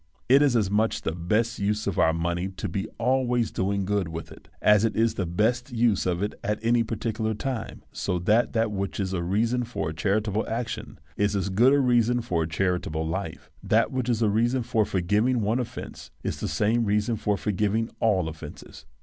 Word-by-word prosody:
It 135 +3 +6
is 140 -4 +3
as 105 -4 +1
much 110 +2 +1
the - - -1
best 105 +7 0
use 105 +2 0
of 100 - -1
our 80 - +5
money 85 +2 -1
to 95 +1 -5
be 95 +4 -3
always 125 -1 +1
doing 100 +1 -1
good 100 -2 0
with 80 -1 -7
it, - - -15
as 105 0 +5
it 115 - +1
is 115 0 +2
the 95 - -2
best 120 +9 0
use 115 -5 +2
of 90 +1 0
it 105 - -2
at 105 +1 0
any 120 +1 +3
particular 110 -1 -2
time; 120 0 -4
so 90 -2 -2
that 105 +7 +2
that 115 -2 +1
which 100 0 -3
is 95 -1 -1
a 90 - -1
reason 115 +8 +1
for 115 -9 -3
a - - -5
charitable 105 +6 0
action 115 0 -4 0.2
is 105 0 +1
as 100 0 -1
good 115 +8 +4
a 145 - +5
reason 120 -2 +3
for 90 -8 -1
a 80 - -1
charitable 80 -1 -1
life. 80 0 -5
That - - +2
which 130 -2 -2
is 115 -1 +1
a 110 - +3
reason 120 +4 +1
for 115 -2 +1
forgiving 105 +8 +1
one 110 +4 +1
offence 125 - -7
is - - -3
the - - -2
same 115 +3 +1
reason 105 +3 +1
for 105 -1 0
for 105 - -2
giving 105 +3 0
all 95 -7 +2
offences. 80 0 -10
105 Hz, 210 wpm, -26 LUFS, 95-115 Hz, 0.2 s, It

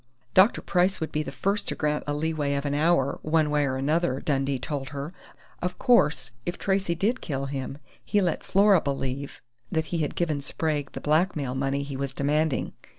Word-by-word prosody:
"Dr. 190 +5 +5
Price 180 +1 +2
would 160 - -3
be 155 - 0
the 145 - -5
first 200 +8 -1
to - - -2
grant 150 0 0
a 145 - 0
leeway 150 -2 -1
of 140 +1 -2
an 145 - 0
hour, 145 -2 +2
one 155 -1 +2
way 145 -1 +2
or 130 - -1
another," 140 0 +1
Dundee 135 -2 0
told 135 +1 -4
her. 145 +4 -5 0.5
"Of 180 +1 -2
course, 150 - +3
if 175 +7 -3
Tracey 195 -3 0
did 220 +9 0
kill 135 -3 -3
him, 135 0 -4 0.3
he 205 - +1
let 180 -5 0
Flora 200 -2 +5
believe 140 0 -3 0.3
that 160 0 0
he 170 - +1
had 150 -3 -1
given 155 -5 0
Sprague 145 -1 -2
the - - -6
blackmail 150 -4 +1
money 135 +1 -1
he 140 -1 -6
was 135 -1 -3
demanding. 150 +1 0
150 Hz, 195 wpm, -26 LUFS, 140-170 Hz, 0.5 s, Dr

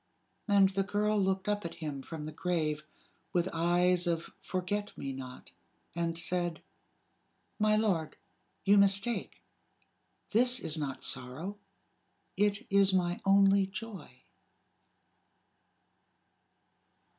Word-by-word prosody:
And 200 -2 +5
the 195 0 -1
girl 210 +1 0
looked 190 0 0
up 205 0 0
at 170 0 -6
him 150 -4 -5
from 155 +2 -7
the 155 - -6
grave, 155 -2 -2 0.5
with 175 -1 +1
eyes 175 +2 +2
of 170 -1 -2
forget 200 +3 -3
me 135 -1 -4
not, 130 -1 -9 0.4
and 170 -1 -2
said: 175 -1 -1 1.0
"My 215 0 +3
lord, 190 -8 0 0.5
you 200 0 +6
mistake. 200 +4 +1 0.9
This 245 +3 +4
is 155 - -1
not 145 -4 -4
sorrow. 160 +12 -1 0.8
It 205 +3 +1
is 195 -1 +4
my 175 -1 0
only 195 0 +5
joy." 195 - -9
185 Hz, 110 wpm, -31 LUFS, 165-200 Hz, 1.0 s, you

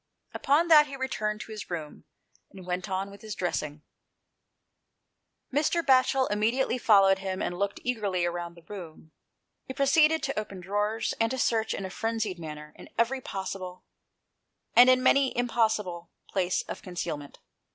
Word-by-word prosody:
Upon 305 +5 +2
that 300 -2 +8
he 275 - -7
returned 215 -5 -2
to - - -9
his 215 -1 -7
room, 160 -4 -6 0.4
and 190 -2 -12
went 180 0 -3
on 190 +1 -2
with 200 0 -13
his 215 -2 -6
dressing. 150 -4 -3 1.7
171 - - -33
GHOST 295 +2 +2
TAIiES. 340 -1 +1
Mr. - - -21 0.4
Batchel - - -6
immediately 230 +5 +1
followed 195 -4 +5
him, 190 -1 -4
and 175 - -3
looked 200 0 -1
eagerly 205 -8 -1
round 175 0 -4
the 170 - -15
room. 165 -4 -10 0.6
He 260 - -6
proceeded 305 +3 +4
to 270 -5 -1
open 200 -3 -7
drawers, 205 +4 -1
and 225 - +3
to 260 - -3
search, 225 -2 +1
in 195 - -5
a 190 - -6
frenzied 225 -4 -2
manner, 150 -2 -8
in - - -13
every 245 +4 +1
possible, 185 -3 -6 0.9
and 245 +1 +9
in 255 0 +4
many 275 0 +4
an - - -3
impossible, 215 -8 -1 0.2
place 185 -2 0
of - - -7
concealment. 170 -6 -5
205 Hz, 170 wpm, -28 LUFS, 180-245 Hz, 1.7 s, and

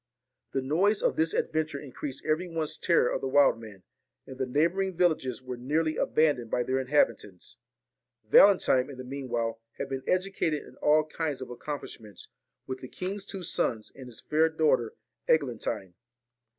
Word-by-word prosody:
The 135 - 0
noise 190 +10 +2
of - - +2
this 160 +1 +2
adventure 155 -2 -1
increased 140 -1 -7
every 155 +4 0
one's 165 -3 -3
terror 170 -8 +2
of - - -2
the - - -2
wild 135 -3 +4
man, 105 -4 -12 0.4
and 130 - -11
the 130 - -1
neighbouring 170 +7 +1
villages 130 -9 +1
were 125 -1 -6
nearly 155 +5 0
abandoned 145 -9 +1
by 125 - 0
their 130 +2 0
inhabitants. 115 -8 0 0.7
Valentine, 140 - +5
in 135 - -9
the 130 - -7
meanwhile, 120 -4 -3 0.2
had 140 - -4
been 135 -1 -3
educated 185 -5 0
in - - -15
all 155 +1 +3
kinds 155 -2 -3
of 130 - -7
accomplishments 120 -5 -8 0.4
with 130 0 -5
the 130 - -8
king's 195 +7 -5
two 195 -2 -6
sons 115 -8 -1
and 130 -2 -11
his 120 -3 -10
fair 160 +1 +2
daughter, 155 -8 +1 0.3
Eglantine. 120 - 0
140 Hz, 165 wpm, -28 LUFS, 125-160 Hz, 0.7 s, Valentine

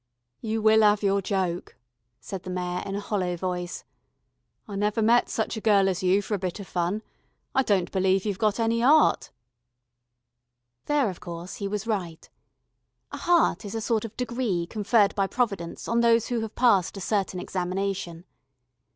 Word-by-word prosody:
"You 220 -1 -2
will 220 0 +5
'ave 210 0 +3
your 200 0 +2
joke," 185 -3 -2 0.4
said 190 -2 -7
the 185 - -8
Mayor 180 0 -3
in 195 - -3
a - - -2
hollow 185 -4 -2
voice. 180 0 -4 0.8
"I 205 - -7
never 210 +2 0
met 230 +2 +4
such 220 - -2
a 220 - -5
gurl 200 -3 +4
as 185 -2 -1
you 190 +2 +2
for 210 - -4
a 205 - 0
bit 185 +1 -4
of 200 - -7
fun. 180 +5 -2 0.5
I 265 - +4
don't 200 -8 +1
believe 190 0 +1
you've 200 -3 -2
got 215 -1 +1
any 230 0 +1
'eart." 300 +4 +4 1.6
There, 290 -8 +1
of 180 - -12
course, 170 +1 -7
he 200 - -3
was 210 +2 -3
right. 185 -8 -3 0.8
A - - -5
heart 345 -8 +2
is 205 +1 -6
a - - -1
sort 220 -1 0
of 225 - -8
degree 235 -8 -1
conferred 205 +1 +2
by 195 -1 0
Providence 200 -8 -2
on 230 - +1
those 230 -1 +3
who 240 -2 0
have 220 -1 -5
passed 200 -6 +3
a - - -5
certain 195 -2 -1
examination. 180 -1 -3
200 Hz, 175 wpm, -26 LUFS, 185-225 Hz, 1.6 s, will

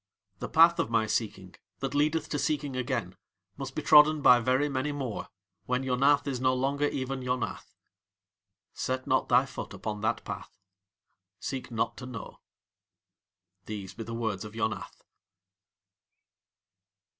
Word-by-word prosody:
The - - -5
path 165 +1 +6
of - - 0
my 115 -1 +2
seeking, 105 -4 -2 0.2
that 135 +6 -3
leadeth 150 +2 +1
to 145 - -1
seeking 140 -1 -1
again, 130 -2 -2 0.4
must - - -6
be - - -3
trodden 150 0 +7
by 125 -1 +8
very 130 +4 +2
many 140 +1 -1
more, 135 -6 -4 0.4
when 125 +1 0
Yonath 135 +3 +3
is 130 -3 -3
no 130 0 +3
longer 140 +3 +1
even 135 -1 -3
Yonath. 125 -4 -3 1.0
Set 130 0 -2
not 130 - +1
thy 125 +2 +5
foot 135 - -7
upon 105 -1 -4
that 110 +2 -1
path. - - -6 0.9
Seek 130 -1 -4
not 115 -2 -1
to 125 - -7
know. 115 -4 -8 1.3
These 100 -3 -6
be 105 - -9
the 115 +1 -6
Words 110 -4 -2
of 105 0 -9
Yonath. 110 -2 -3
130 Hz, 145 wpm, -29 LUFS, 115-140 Hz, 1.3 s, by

